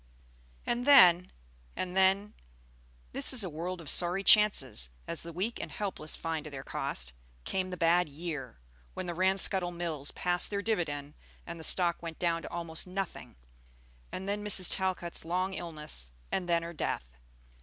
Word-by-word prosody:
And 245 +2 -2
then, 180 -10 +7 0.4
and 180 0 -4
then, 195 +2 +2 0.8
this - - +2
is 250 -5 +4
a 185 - -5
world 175 +4 -5
of 165 - -11
sorry 180 +6 +1
chances, 165 - +5 0.2
as 170 - -3
the 170 - -7
weak 195 +8 -3
and - - -7
helpless 190 -7 -4
find 160 -2 -4
to - - -7
their 135 -2 -8
cost, 65 - -4 0.3
came 185 - -2
the 180 - -6
bad 170 0 +2
year, 150 - -7 0.4
when - - -5
the 175 - -4
Ranscuttle 190 0 +3
Mills 165 -5 -4
passed 175 0 -1
their 200 -1 -3
dividend 150 -9 -3 0.3
and 170 -1 -8
the - - -7
stock 170 0 +3
went 165 -2 -7
down 170 -1 -1
to - - -8
almost 165 0 -5
nothing; 190 - -6 0.8
and 190 +1 -6
then 205 +1 -2
Mrs. 195 -3 +8
Talcott's 185 -3 -2
long 185 +3 -2
illness, 150 - -4 0.2
and 180 -2 -2
then 170 -1 +2
her 170 +1 -7
death. 145 - -3
175 Hz, 165 wpm, -30 LUFS, 160-190 Hz, 0.8 s, Mrs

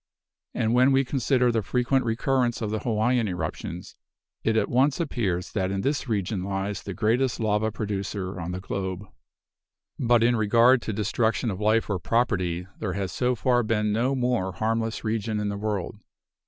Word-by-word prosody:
And 115 -1 +1
when 130 +2 +5
we 135 0 +3
consider 125 -1 +2
the 115 -1 +1
frequent 125 +5 +1
recurrence 120 +1 +1
of 110 -2 -3
the 110 - -1
Hawaiian 115 +1 +1
eruptions, 90 -1 -5 0.5
it 110 0 +2
at - - +2
once 135 +5 +2
appears 100 - -1
that 95 -3 -1
in 95 0 -2
this 140 +1 -1
region 100 -3 -1
lies 95 0 -3
the 100 - -6
greatest 120 +4 +1
lava 110 0 +1
producer 100 -3 -4
on 85 +2 -4
the 90 - -4
globe. 95 0 -4 0.9
But 120 -2 +3
in 120 +1 +4
regard 115 +3 +4
to 110 - -3
destruction 110 +2 0
of 95 +1 -6
life 110 +2 +2
or 100 -3 -1
property, 90 -5 0
there 95 -4 -2
has 95 -2 -3
so 125 +7 0
far 120 +1 +2
been 105 -2 0
no 125 +5 +1
more 125 -7 0
harmless 115 +3 -1
region 110 -1 -1
in 105 0 -1
the 100 - -3
world. 105 -1 -3
110 Hz, 175 wpm, -26 LUFS, 100-120 Hz, 0.9 s, when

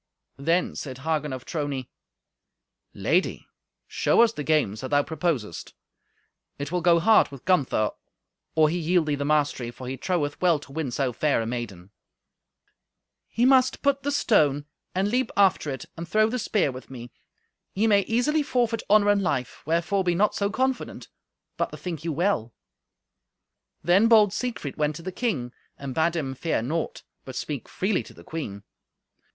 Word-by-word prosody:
Then 165 +6 +1
said 130 -3 -6
Hagen 150 0 -1
of 130 -1 -6
Trony, 145 -5 -3 1.0
"Lady, 160 - 0 0.4
show - - +3
us 230 -1 +2
the 150 - -5
games 140 -10 +1
that 130 - -5
thou 145 0 +3
proposest. 155 - -3 0.8
It 145 +1 -5
will 180 0 0
go 170 0 +5
hard 220 +5 +5
with 140 -3 -12
Gunther 135 - +2 0.6
or 155 -1 +5
he 175 +3 -1
yield 170 0 +2
thee 150 - 0
the 140 0 -2
mastery, 145 -5 +1
for 125 +1 -9
he 130 +1 -4
troweth 150 -5 -1
well 175 -3 +4
to 145 -1 -13
win 155 -1 -3
so 125 0 -1
fair 150 +2 +1
a 115 - -2
maiden." 105 -6 -6 1.4
"He 235 - +1
must 260 -1 +4
put 280 -1 +2
the 285 - -2
stone, 150 - +2 0.3
and 190 +2 +1
leap 250 +4 0
after 195 -6 +3
it, 135 -1 -5
and 165 +1 -6
throw 215 +2 +3
the 250 - -1
spear 205 -9 +1
with 130 0 -10
me. 120 -2 -9 0.6
Ye 205 +3 +2
may 205 -2 +5
easily 245 +7 +1
forfeit 240 -5 0
honour 205 0 +5
and 205 -1 +2
life; 130 -9 -2
wherefore 170 +4 +1
be 175 -1 +1
not 205 +4 +2
so 200 0 0
confident, 260 +4 -2 0.5
but - - 0
bethink 165 -4 -6
you 165 - -2
well." 155 - 0 1.3
Then 185 +7 +5
bold 215 -4 +6
Siegfried 230 - -4
went 150 -1 0
to 165 - -9
the 185 - -4
king, 160 - -2 0.2
and 140 -2 -6
bade 165 +3 +1
him 135 -5 -2
fear 135 -3 -1
naught, 160 +6 -3 0.2
but 130 - -9
speak 145 -4 -5
freely 190 0 0
to - - -14
the - - -14
queen. 105 -12 -6
160 Hz, 170 wpm, -25 LUFS, 135-200 Hz, 1.4 s, bold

